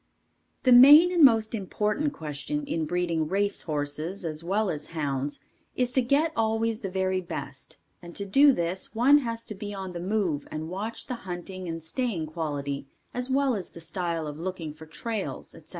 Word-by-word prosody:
The 255 - +4
main 290 +8 +9
and 345 -3 +4
most 225 -4 +5
important 210 +7 -1
question 160 - -4
in 165 - -2
breeding 170 -2 0
race 200 +3 0
horses 155 +5 -3
as 155 0 -3
well 200 +4 0
as 150 -1 -5
hounds 140 -1 -2 0.4
is 250 -1 0
to 260 - +3
get 280 +6 +2
always 225 0 0
the 195 - -4
very 190 0 0
best 145 -3 -7 0.2
and 170 -1 -11
to 200 - -3
do 275 +9 +6
this, 185 -1 -3
one 270 +6 +6
has 230 -4 -4
to - - -3
be 205 0 -6
on 190 -2 -6
the 175 - -5
move 180 -6 -1
and 155 +1 -5
watch 210 +5 -4
the - - -4 0.2
hunting 180 +1 -6
and 165 -1 -5
staying 190 -1 -2
quality 145 -3 -4 0.3
as 250 +1 -3
well 270 0 +2
as 195 -5 -3
the - - -12
style 165 -1 -3
of 150 0 -6
looking 170 -3 -4
for 160 +1 -13
trails, 220 +5 -4
etc. - - -15
190 Hz, 185 wpm, -27 LUFS, 160-230 Hz, 0.4 s, main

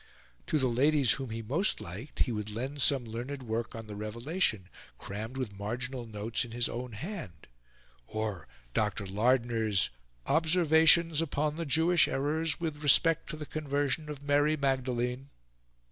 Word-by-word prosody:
To 155 - +1
the 130 -3 +2
ladies 135 +2 +3
whom 135 -3 -1
he 115 +1 -5
most 155 - +1
liked, 105 - -7
he 125 - +2
would 105 -2 -3
lend 130 +7 -4
some 130 -2 +3
learned 125 +5 -5
work 115 0 -3
on 115 0 -7
the 105 -1 -8
Revelation, 110 - -1 0.3
crammed 110 +6 -6
with 120 -7 -4
marginal 120 +4 -4
notes 110 +1 -2
in 120 - -8
his 120 0 +1
own 120 0 -5
hand, 105 - -7 0.6
or 110 -4 -4 0.3
Dr. 105 -1 0
Lardner's 110 - +1 0.3
"Observations 160 -1 +4
upon 150 -1 -1
the 165 -1 -4
Jewish 165 +4 +4
Errors 155 +3 0
with 155 -3 -3
respect 165 +3 +4
to 155 - -5
the 150 - -6
Conversion 145 0 -2
of 145 -2 -7
Mary 145 +2 +3
Magdalene." 130 -1 -1
130 Hz, 150 wpm, -30 LUFS, 110-150 Hz, 0.6 s, Observations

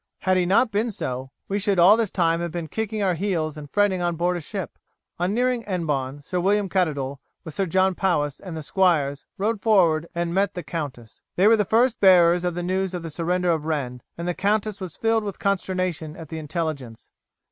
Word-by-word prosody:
Had 185 0 +2
he 180 -1 +2
not 220 +5 +3
been 215 +4 0
so, 130 - -4 0.2
we 200 +1 -1
should 200 -1 0
all 180 +5 +7
this 225 -3 0
time 165 -3 +1
have 170 0 -2
been 170 -1 -4
kicking 215 +3 -3
our 185 -2 +2
heels 165 -4 -1
and 150 -2 -9
fretting 205 -1 +2
on 175 -1 0
board 175 +2 0
a 175 - -4
ship." 190 +3 -6 0.4
On 180 +2 0
nearing 245 +2 +1
Hennebon, 145 -7 -2
Sir 180 +5 -2
William 200 +2 +2
Caddoudal, 145 -8 -1 0.2
with 160 -4 -8
Sir 195 +3 -1
John 190 +3 +2
Powis 150 -7 0
and 180 -4 -7
the 155 - -6
squires, 150 -6 +1
rode 210 +1 -1
forward 170 -7 +3
and 170 0 -1
met 195 +1 +1
the 180 - -4
countess. 140 -7 -6
They 185 - +3
were 225 - +7
the 210 -2 +1
first 235 +3 +2
bearers 175 -2 +6
of 175 -1 -1
the 175 - -3
news 190 +1 -1
of 175 - -5
the 165 - -6
surrender 175 +2 0
of 160 -2 -1
Rennes, 130 -6 -3 0.2
and 170 +1 -4
the 175 - 0
countess 205 +2 -1
was 180 -4 -7
filled 225 -1 +1
with 200 -2 -5
consternation 185 -5 -2
at 160 -3 -10
the 160 - -5
intelligence. 150 -7 -5
180 Hz, 215 wpm, -24 LUFS, 160-195 Hz, 0.4 s, all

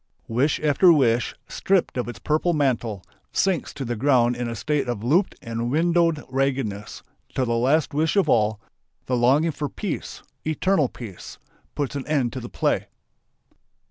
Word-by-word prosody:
Wish 130 +7 +1
after 155 +4 +5
wish, 125 -6 +2
stripped 190 -2 0
of 125 -2 -2
its 120 - -6
purple 155 +3 0
mantle, 120 - 0 0.3
sinks 190 -4 0
to 135 - -4
the 120 0 -2
ground 120 -1 +3
in 120 0 -3
a 115 - -4
state 140 +5 -1
of 120 -4 -3
"looped 170 - +2
and 115 -1 -3
windowed 165 +1 +2
raggedness," 130 -6 -2 0.3
till 130 - +1
the 120 - 0
last 135 +7 +2
wish 155 +4 +1
of 200 - +3
all 105 -1 +2 0.5
the 130 - 0
longing 135 +7 +3
for 145 -1 -4
peace, 200 -6 -5 0.2
eternal 155 -2 +1
peace 105 -7 -10 0.4
puts 145 -1 -2
an 140 - -4
end 135 -6 0
to 130 - -4
the 120 -1 -8
play. - - 0
135 Hz, 165 wpm, -24 LUFS, 120-155 Hz, 0.5 s, after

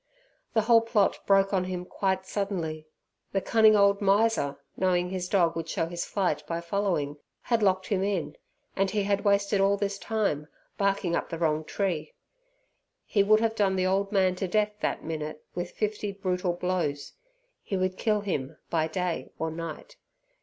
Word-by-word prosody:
The 220 - +5
whole 230 +1 +5
plot 230 -3 +2
broke 195 0 +4
on 185 -2 +2
him 180 -1 -4
quite 190 0 -1
suddenly! 170 -6 -3 0.5
The 195 - +2
cunning 220 +1 +5
old 200 0 +4
miser, 200 -7 +2 0.2
knowing 180 -1 +1
his 180 -1 -3
dog 170 -4 +3
would 165 0 -4
show 165 - 0
his 170 +1 -4
flight 180 -7 0
by 165 +1 -2
following, 170 -5 -1 0.3
had 235 -2 +1
locked 190 -2 +2
him 195 -3 +1
in, 195 -4 -1 0.4
and 195 0 +1
he 205 +1 0
had 200 0 0
wasted 200 0 +2
all 200 +1 +3
this 200 0 -2
time 200 -10 -1 0.3
barking 195 -3 +1
up - - -2
the 165 - -4
wrong 155 -2 +1
tree. 165 -4 -2 0.9
He 205 - +2
would 215 +2 +5
have 225 -1 +1
done 200 -3 +1
the 185 -1 +1
old 195 +2 +1
man 190 -3 +3
to 190 - -2
death 210 +3 +1
that - - -2
minute 155 -1 -5
with 175 0 -3
fifty 210 -1 -2
brutal 185 -2 -1
blows. 175 -5 -2 0.5
He 195 - -3
would 185 0 0
kill 210 0 +1
him 150 -7 -3
by 160 -2 +2
day 180 +1 -2
or 160 0 -2
night. 165 - -7
190 Hz, 175 wpm, -28 LUFS, 170-200 Hz, 0.9 s, The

